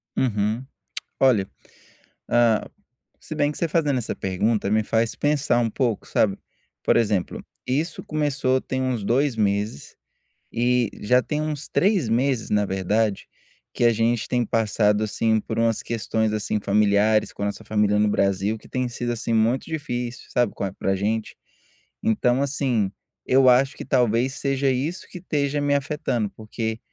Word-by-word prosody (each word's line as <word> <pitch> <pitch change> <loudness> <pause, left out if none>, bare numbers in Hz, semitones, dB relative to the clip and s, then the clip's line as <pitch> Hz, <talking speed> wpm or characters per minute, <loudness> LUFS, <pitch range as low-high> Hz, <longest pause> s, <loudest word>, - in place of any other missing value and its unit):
Uhum, 110 0 0 0.6
olha, 115 -8 +4 0.8
hum, 120 -2 +3 0.5
se 155 - -7
bem 145 -1 +1
que - - -8
você 170 - 0
fazendo 150 -4 +1
essa 115 - -4
pergunta 100 +3 0
me 110 0 +3
faz 115 +1 0
pensar 145 -4 +1
um 115 -1 +1
pouco 115 -2 -1
sabe? 100 -2 +1 0.5
Por - - +3
exemplo, 105 -5 0 0.2
isso 150 +6 -1
começou 140 -4 0
tem 130 0 -3
uns 125 -5 -1
2 130 +5 +1
meses, 100 -5 -1 0.6
e 120 -1 +1
já 125 +5 +4
tem 150 +3 -2
uns 155 -1 -4
3 190 - +2
meses 125 0 +1
na 105 -1 +2
verdade, 100 +2 0 0.5
que - - -1
a 115 - +5
gente 115 +1 0
tem 125 -1 0
passado, 105 -1 +1
assim, 110 +1 +1
por 110 +1 -4
umas 115 -1 +1
questões, 110 -1 -1
assim, 105 0 -1
familiares 105 +1 +2
com 100 - -5
a - - +1
nossa 100 - -5
família 105 -1 +2
no 105 - +3
Brasil 100 +1 +1
que - - -17
tem 130 -1 -1
sido, 120 0 -3
assim, 115 0 -2
muito 115 +4 +2
difícil, 125 -6 -4
sabe, 120 -3 +1
qual 95 -1 -3
para 95 0 -1
gente. 105 +3 -2 0.7
Então 120 +4 +2
assim, 130 -7 0 0.4
eu 130 0 +5
acho 130 +2 +4
que - - -6
talvez 125 0 +2
seja 135 -1 0
isso 145 +8 -2
que - - -9
esteja 145 -4 -1
me 145 0 +2
afetando 135 -6 -1
porque, 110 +1 -4
115 Hz, 160 wpm, -23 LUFS, 105-135 Hz, 0.8 s, a